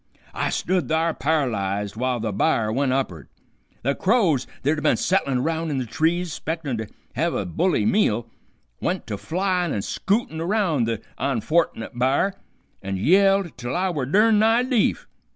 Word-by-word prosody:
"I - - -1
stood 180 -7 -1
thar 160 +1 +1
par'lyzed 105 -11 -1
w'ile 125 +1 -1
the 110 -1 -2
b'ar 110 +2 +1
went 135 +1 +1
up'ard. 130 - -2 0.5
The 140 +3 +1
crows 185 - +2 0.2
that 145 - +3
had 155 -1 -1
been - - +3
settlin' 135 -9 +1
round 165 0 -1
in 145 - -1
the 130 - -1
trees, 160 +8 0
'spectin' 160 -5 -3
to 110 - -4 0.3
hev 165 +6 0
a 100 - -1
bully 135 - +1
meal, 195 - +2 0.5
went - - -2
to 105 - -4
flyin' 180 - -1
an' 100 - -2
scootin' 195 - -1
around 170 - +1
the 115 -2 -2 0.2
onfortnit 135 0 0
b'ar, 135 +10 +2 0.5
an' 95 0 -3
yelled 195 - +3
till 120 0 -3
I 185 +1 +1
were 140 -7 -2
durn 210 - +4
nigh 225 +3 +4
deef. 250 -4 +1
155 Hz, 165 wpm, -23 LUFS, 120-185 Hz, 0.5 s, durn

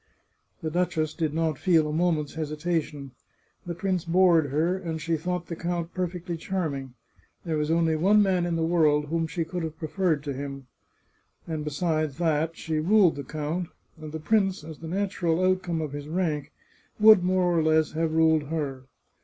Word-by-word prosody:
The 160 - -2
duchess 165 -3 0
did 160 -3 -1
not 160 -2 -1
feel 165 -5 +3
a 150 - -3
moment's 160 -3 0
hesitation. 155 -2 -3 0.6
The 170 - -3
prince 185 0 -1
bored 170 -3 +4
her, 160 +6 +1
and 165 -4 -4
she 165 +1 -1
thought 175 +2 -3
the 170 - -5
count 170 0 -3
perfectly 180 -1 -3
charm 175 -3 -2
ing. 135 -2 -7 0.5
There 165 -2 -1
was 150 0 -1
only 165 -1 +2
one 195 +7 +4
man 185 -4 +2
in 170 - -1
the 165 - 0
world 155 -3 +3
whom 165 0 0
she 160 +2 -3
could 180 +2 -4
have 160 -1 -5
preferred 160 -2 -1
to 145 -2 -3
him. 135 0 -6 0.8
And 160 -2 -3
besides 155 -1 -1
that, 160 -1 0
she 160 -2 -2
ruled 185 +1 +4
the 140 - -5
count, 155 +5 -3 0.3
and 155 -2 -9
the 160 - -5
prince, 195 -1 +1
as 155 -1 -9
the 165 - -8
natural 180 -2 -1
outcome 185 -3 +1
of 155 -3 -4
his 145 0 -6
rank, 155 -3 -2 0.5
would 215 -3 +8
more 180 -1 +2
or 165 - +3
less 155 0 +2
have 160 0 -1
ruled 160 -2 +4
her. 140 -4 -3
160 Hz, 185 wpm, -26 LUFS, 155-175 Hz, 0.8 s, would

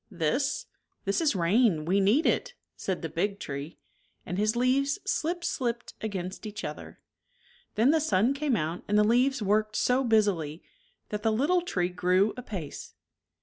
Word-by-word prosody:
" - - -46 0.2
This? 280 - 0 0.4
This 200 +10 +1
is 305 -8 +2
rain; 180 -2 +2
we 190 +4 +2
need 215 +11 +3
it," - - 0 0.2
said 190 -3 -3
the - - -1
big 195 +6 -1
tree, 140 +1 -6 0.5
and 180 +2 -3
his 215 +2 +2
leaves 265 +3 +2
slip 345 +2 -1
slipped 235 -6 -2
against 195 -1 -4
each 210 0 -7
other. - - -7 0.8
Then 230 +6 +4
the 320 0 +2
sun 230 -2 +2
came 280 -2 0
out 165 -2 -2
and 210 - +2
the 210 - +6
leaves 245 +2 +2
worked 215 +1 +1
so 250 +4 +2
busily 200 - +1 0.5
that 210 0 -3
the 220 - +2
little 295 +11 +2
tree 180 - -1
grew 185 +3 +2
apace. 195 - -7
215 Hz, 165 wpm, -28 LUFS, 185-255 Hz, 0.8 s, the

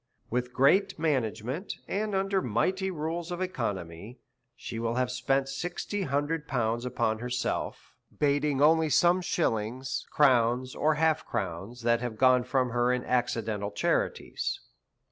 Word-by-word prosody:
With 125 +1 -1
great 140 +11 +3
management 135 - -1
and 210 0 -1
under 195 0 +1
mighty 185 - 0
rules 165 +1 -3
of 175 - -3
economy, 110 - -4 0.4
she 115 - -6
will 115 0 -1
have 125 0 0
spent 135 +2 0
sixty 175 +8 -3
hundred 150 -1 -1
pounds 120 -2 -1
upon 115 -3 0
herself, 125 +1 -3 0.2
bating 145 -1 +2
only 160 +1 +5
some 175 +4 +4
shillings, 125 -6 -1
crowns, 125 -2 +3
or 155 0 +2
half 160 0 +2
crowns, 95 +7 -4
that 115 0 +2
have 120 -3 -4
gone 125 0 +4
from 125 -1 +1
her 120 +1 +2
in 125 0 -1
accidental 115 -4 -1
charities. 105 - -1
130 Hz, 135 wpm, -28 LUFS, 120-155 Hz, 0.4 s, only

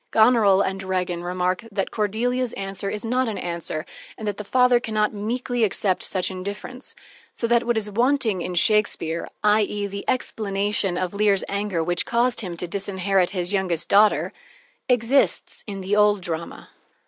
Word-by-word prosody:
Goneril 220 -4 +5
and 190 0 -3
Regan 185 -2 -2
remark 180 +2 -1
that 195 -1 -2
Cordelia's 235 +4 -1
answer 195 0 -4
is 210 +2 -3
not 250 +1 +1
an 215 - -4
answer, 170 -2 -4 0.3
and 215 - -6
that 205 -1 -2
the 210 - -5
father 250 +3 +4
can 220 -2 -6
not 210 0 +2
meekly 235 +3 -2
accept 195 -2 +1
such 185 0 0
indifference, 200 +7 -7 0.4
so - - -2
that 235 0 +2
what 240 -1 +2
is 215 -1 0
wanting 230 -2 +1
in 180 - -4
Shakespeare 170 -4 +1 0.2
i.e., 210 -1 +2
the 200 0 -5
explanation 205 -5 -1
of 185 0 -2
Lear's 200 -1 +2
anger 200 -4 -1
which 175 +1 -1
caused 240 +1 +1
him 180 -5 -6
to 180 - -3
disinherit 195 0 0
his 180 0 -2
youngest 180 -4 -1
daughter, 205 +1 +4 0.6
exists 250 +2 +2
in 195 -2 -5
the 195 +2 0
old 210 -1 +4
drama. 170 -1 -6
205 Hz, 165 wpm, -23 LUFS, 185-220 Hz, 0.6 s, Goneril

